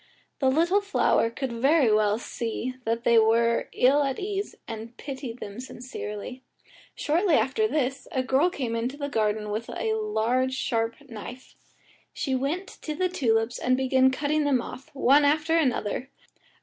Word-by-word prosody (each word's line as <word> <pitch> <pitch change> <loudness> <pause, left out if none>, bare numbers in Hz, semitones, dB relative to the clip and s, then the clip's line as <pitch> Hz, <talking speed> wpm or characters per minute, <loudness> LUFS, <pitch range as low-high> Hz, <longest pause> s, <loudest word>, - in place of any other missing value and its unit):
The 265 - +3
little 340 +8 +3
flower 400 - +2
could 260 +2 -4
very 265 0 +3
well 210 0 +3
see 235 +1 -4
that 230 +1 -1
they 235 -1 +5
were 230 +1 +2
ill 275 +4 +4
at 275 -2 -1
ease, 400 +1 -3
and 225 +1 -7
pitied 265 -4 -6
them 205 -1 -8
sincerely. 250 -2 -7 0.5
Shortly 335 +2 +2
after 435 +12 +2
this 270 -7 -2
a 260 - 0
girl 270 +7 +3
came 250 -9 -3
into 245 +5 -2
the 285 -1 -3
garden, 210 -3 0
with 220 +3 -4
a 440 - -1
large 260 - 0
sharp 230 -3 -1
knife. 245 +2 -9 0.6
She 270 - -2
went 285 +9 -1 0.2
to 305 - -4
the 365 +3 0
tulips 230 -8 0
and 255 0 +2
began 260 0 +4
cutting 300 +3 0
them 280 -3 +2
off, 260 +4 -8
one 275 +2 +5
after 310 +3 +2
another. 260 -4 0
260 Hz, 160 wpm, -26 LUFS, 230-295 Hz, 0.6 s, they